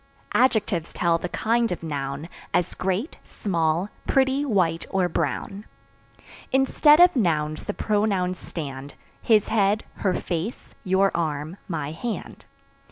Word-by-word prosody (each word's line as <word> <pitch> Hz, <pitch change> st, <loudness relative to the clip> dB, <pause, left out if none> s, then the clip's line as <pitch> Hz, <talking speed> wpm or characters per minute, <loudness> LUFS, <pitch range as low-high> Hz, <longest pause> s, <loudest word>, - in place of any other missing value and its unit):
Adjectives 210 Hz, -9 st, +2 dB
tell 170 Hz, -1 st, +1 dB
the 180 Hz, -, -4 dB
kind 230 Hz, +2 st, +1 dB
of 175 Hz, -, -4 dB
noun, 140 Hz, 0 st, -4 dB, 0.3 s
As 175 Hz, -, +1 dB
great, 190 Hz, -, -2 dB
small, 170 Hz, -1 st, -1 dB, 0.2 s
pretty, 270 Hz, +1 st, +2 dB
white, 185 Hz, -, +1 dB
or 190 Hz, -2 st, +1 dB
brown. 195 Hz, +3 st, -2 dB, 0.9 s
Instead 280 Hz, +3 st, +5 dB
of 355 Hz, -1 st, +7 dB
Nouns 155 Hz, -, 0 dB
the 205 Hz, -, -3 dB
Pronouns 200 Hz, -4 st, 0 dB
stand 140 Hz, -3 st, -7 dB, 0.3 s
His 215 Hz, -3 st, +3 dB
head, 210 Hz, 0 st, +2 dB
her 190 Hz, -3 st, 0 dB
face, 175 Hz, +8 st, -4 dB
your 195 Hz, 0 st, +2 dB
arm, 155 Hz, +1 st, -2 dB
my 155 Hz, -5 st, -3 dB
hand. 225 Hz, +8 st, -6 dB
185 Hz, 125 wpm, -24 LUFS, 165-220 Hz, 0.9 s, of